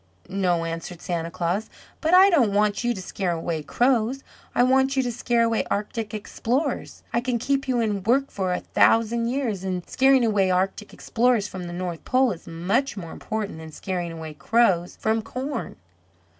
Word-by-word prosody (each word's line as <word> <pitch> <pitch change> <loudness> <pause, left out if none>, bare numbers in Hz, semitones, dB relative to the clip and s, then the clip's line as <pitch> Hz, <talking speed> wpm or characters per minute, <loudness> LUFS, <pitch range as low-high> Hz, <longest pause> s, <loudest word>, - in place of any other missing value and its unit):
"No," 180 -3 0
answered 165 +1 -5
Santa 170 -2 -3
Claus, 175 +5 -2 0.3
"but 320 - +1
I 385 +2 +8
don't 245 - +3
want 210 +2 +2
you 240 - +1
to 190 - -6
scare 180 -1 -2
away 165 -1 -3
crows. 245 - +1 0.3
I 245 - +5
want 265 +1 +3
you 265 - +3
to 245 - -2
scare 235 0 +1
away 230 -1 +1
Arctic 210 +1 -2
Explorers. 245 +6 -2
I 235 - +2
can 245 -1 0
keep 270 +3 -1
you 250 -2 +1
in 210 -4 0
work 265 +7 +1
for 190 -2 -2
a 180 - -1
thousand 230 +1 +3
years, 235 -7 -2
and 185 -2 -3
scaring 265 -2 +4
away 205 -4 +2
Arctic 190 +3 -1
Explorers 235 -3 +1
from 185 -3 -7
the 175 - -6
North 175 -2 -4
Pole 255 -1 +3
is 170 - -8
much 195 +11 -1
more 170 -4 -6
important 210 -6 -4
than 160 0 -9
scaring 175 0 -4
away 160 -1 -7
crows 175 +3 +2
from 220 +1 0
corn. 265 +5 -5
215 Hz, 185 wpm, -24 LUFS, 180-245 Hz, 0.3 s, I